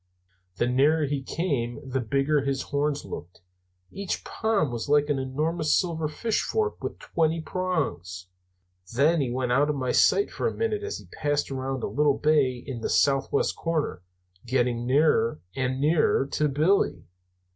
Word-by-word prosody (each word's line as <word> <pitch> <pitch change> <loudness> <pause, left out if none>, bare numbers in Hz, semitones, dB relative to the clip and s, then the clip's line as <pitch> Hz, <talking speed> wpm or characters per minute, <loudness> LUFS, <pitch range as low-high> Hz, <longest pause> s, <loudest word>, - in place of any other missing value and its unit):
The 120 - +1
nearer 145 +5 +3
he 140 -1 -2
came 135 -6 -2
the 130 0 -1
bigger 140 +5 +1
his 135 -1 -1
horns 145 0 -1
looked; 85 -1 -9 0.5
each 195 -2 -4
palm 205 - 0
was 120 +2 -4
like 145 0 +3
an 145 -2 +1
enormous 155 +5 0
silver 165 -4 -1
fish 210 +9 -1
fork 435 0 -2
with - - -4
twenty 165 0 0
prongs. 140 - -3 0.7
Then 150 +5 +3
he 130 - -1
went 125 0 -1
out 140 +4 +3
of 150 - 0
my 130 -2 -1
sight 405 - +3
for - - -1
a - - -3
minute 445 -2 -1
as 420 +1 -4
he - - -12
passed 145 -1 -1
around 130 -1 -3
a - - 0
little 145 -1 +2
bay 140 -5 +2
in 130 -5 -6
the - - -2
southwest 135 0 +2
corner, 155 - -2 0.4
getting 120 -1 0
nearer 130 - +3 0.2
and 130 0 -1
nearer 150 -1 +3
to 150 - +1
Billy. 155 +8 +2
145 Hz, 165 wpm, -26 LUFS, 130-160 Hz, 0.7 s, nearer